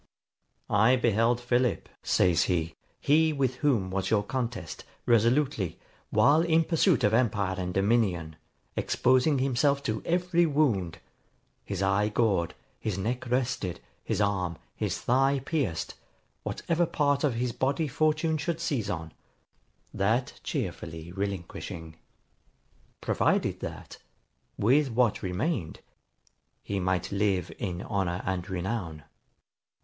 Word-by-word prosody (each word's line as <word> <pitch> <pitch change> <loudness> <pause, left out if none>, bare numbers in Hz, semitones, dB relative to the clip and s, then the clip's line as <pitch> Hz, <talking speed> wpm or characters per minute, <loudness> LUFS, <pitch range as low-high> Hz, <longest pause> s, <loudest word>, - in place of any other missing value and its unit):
'I 110 +5 +5
beheld 120 0 +2
Philip,' 120 0 0
says 85 -2 +3
he, 85 -3 -1 0.2
'he 160 +2 +3
with 135 -4 0
whom 120 -11 +1
was 95 0 -1
your 105 -2 +2
contest, 115 -8 -4 0.2
resolutely, 115 - +2 0.3
while 150 +3 +5
in 165 -1 +3
pursuit 165 - +2
of 105 - +3
empire 105 -5 +2
and 90 0 -2
dominion, 95 -5 +1 0.4
exposing 130 +3 +2
himself 140 +2 +1
to 110 -3 -2
every 175 0 +2
wound; 125 - +1 0.7
his 100 -1 -3
eye 100 +2 +2
gored, 105 -6 +1 0.2
his 105 -4 -2
neck 120 +5 -3
wrested, 125 -8 -1 0.2
his - - -2
arm, 95 -5 0 0.2
his - - -2
thigh 135 +3 +2
pierced, 140 - -1 0.5
what - - -5
ever 170 0 +2
part 145 -2 +1
of 140 -6 +2
his 120 +1 -1
body 140 +6 0
fortune 155 +3 +1
should 165 +2 -2
seize 120 -8 -1
on, 80 -2 -4 0.8
that 110 +6 0
cheerfully 80 +1 -4
relinquishing; 90 -4 -5 1.1
provided - - +1
that, - - -7 0.6
with 135 +7 +3
what 115 -3 +1
remained, 95 - -2 0.8
he 100 -1 -2
might 90 -1 -1
live 100 -3 0
in 90 -3 -3
honour 95 -4 -2
and 95 0 -2
renown. 90 -4 -3
115 Hz, 120 wpm, -28 LUFS, 95-135 Hz, 1.1 s, I